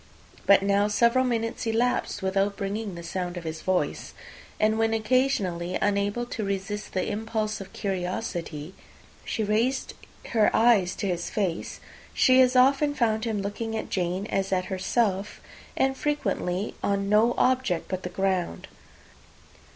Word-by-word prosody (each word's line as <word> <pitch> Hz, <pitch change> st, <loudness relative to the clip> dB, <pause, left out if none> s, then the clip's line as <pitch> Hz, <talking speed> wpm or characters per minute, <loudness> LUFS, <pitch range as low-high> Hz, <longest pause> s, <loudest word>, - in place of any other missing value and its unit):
But 200 Hz, -1 st, +6 dB
now 200 Hz, +1 st, +3 dB
several 235 Hz, +4 st, +3 dB
minutes 230 Hz, -2 st, -2 dB
elapsed, 230 Hz, -2 st, 0 dB
without 195 Hz, +1 st, 0 dB
bringing 200 Hz, -1 st, -3 dB
the 170 Hz, -, -8 dB
sound 175 Hz, +1 st, -4 dB
of 175 Hz, -, -6 dB
his 160 Hz, -1 st, -5 dB
voice; 185 Hz, -1 st, -1 dB, 0.4 s
and 215 Hz, +1 st, +2 dB
when 225 Hz, 0 st, +2 dB
occasionally, 215 Hz, -7 st, 0 dB
unable 205 Hz, +3 st, 0 dB
to 230 Hz, -2 st, -4 dB
resist 200 Hz, +1 st, -4 dB
the 185 Hz, -, -1 dB
impulse 215 Hz, -1 st, -2 dB
of 195 Hz, -, -10 dB
curiosity, 180 Hz, -4 st, -4 dB, 0.5 s
she 220 Hz, -, -2 dB
raised 225 Hz, +6 st, 0 dB, 0.4 s
her 220 Hz, -3 st, +4 dB
eyes 210 Hz, -6 st, +4 dB
to 200 Hz, -, -3 dB
his 175 Hz, -2 st, -2 dB
face, 190 Hz, -6 st, -2 dB, 0.4 s
she 260 Hz, 0 st, +6 dB
as 255 Hz, 0 st, +4 dB
often 275 Hz, +3 st, +4 dB
found 220 Hz, -3 st, +1 dB
him 215 Hz, -3 st, -1 dB
looking 220 Hz, +2 st, -3 dB
at -, -, -5 dB
Jane 180 Hz, +1 st, -1 dB
as 195 Hz, 0 st, 0 dB
at 185 Hz, -1 st, +1 dB
herself, 195 Hz, +1 st, 0 dB, 0.4 s
and 265 Hz, 0 st, +2 dB
frequently 220 Hz, -10 st, -1 dB
on 200 Hz, 0 st, 0 dB
no 215 Hz, +4 st, +4 dB
object 255 Hz, -10 st, +1 dB
but 185 Hz, -1 st, -3 dB
the 180 Hz, -, -5 dB
ground. 185 Hz, -, -1 dB
205 Hz, 145 wpm, -26 LUFS, 185-230 Hz, 0.5 s, But